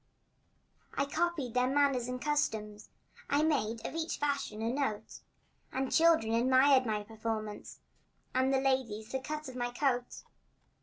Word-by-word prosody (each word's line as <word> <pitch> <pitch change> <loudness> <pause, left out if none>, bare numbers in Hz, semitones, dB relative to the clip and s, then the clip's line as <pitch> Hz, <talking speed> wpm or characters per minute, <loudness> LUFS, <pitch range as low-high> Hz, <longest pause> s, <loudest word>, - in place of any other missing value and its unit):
I - - +1
copied 310 -4 -1
their 250 0 +2
manners 270 -3 +2
and 250 0 -4
customs 220 -8 -2 0.4
I 285 +2 +3
made 230 -8 0
of - - -4
each 325 0 -2
fashion 280 -7 -2
a 230 +2 0
note; 265 -7 -3 0.5
And 265 +1 -1
the - - -12
children 320 -9 +4
admired 260 +2 +5
my 210 -1 -1
performance 215 -1 -5 0.5
And 260 +1 +2
the 270 - +3
ladies 250 -5 -1
the 265 - -1
cut 300 +3 -5
of 260 - -8
my 245 -1 -1
coat. 245 -1 -1
255 Hz, 150 wpm, -32 LUFS, 225-285 Hz, 0.5 s, admired